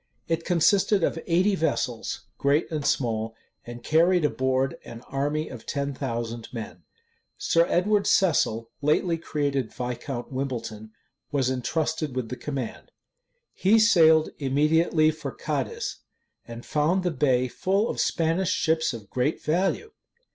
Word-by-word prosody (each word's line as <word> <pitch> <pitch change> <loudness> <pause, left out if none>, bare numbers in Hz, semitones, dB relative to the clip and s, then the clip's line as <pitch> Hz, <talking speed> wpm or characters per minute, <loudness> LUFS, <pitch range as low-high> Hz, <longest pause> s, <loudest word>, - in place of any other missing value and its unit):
It 165 0 -1
consisted 190 +2 +3
of 165 - 0
eighty 180 +4 +3
vessels, 140 -9 -1 0.2
great 145 +5 +1
and 155 -2 -2
small; 115 -5 0 0.3
and 120 0 -9
carried 170 +1 +3
an - - +1
board 130 0 0
an 115 0 -10
army 145 +4 -2
of - - -10
ten 140 -1 -2
thousand 115 -3 -4
men. 115 -3 -7 0.6
Sir 170 +1 +2
Edward 200 +3 +2
Cecil, 115 - +2
lately 165 +3 +1
created 140 -6 -2
Viscount 125 +1 -5
Wimbleton, 120 -5 -4 0.4
was 135 -3 +1
intrusted 155 +2 -2
with 125 -3 -3
the 125 - -4
command. 135 -4 -5 0.6
He 205 +4 +3
sailed 160 -8 +5
immediately 155 +3 +3
for 155 - -6
Cadiz, 460 0 -3 0.5
and 120 0 -9
found 165 +5 +1
the 180 - 0
bay 130 -3 +2
full 195 - 0
of - - -4
Spanish 165 +3 +1
ships 160 -5 +1
of 105 -3 -10
great 125 +8 -1
value. 190 - 0
150 Hz, 135 wpm, -26 LUFS, 125-165 Hz, 0.6 s, sailed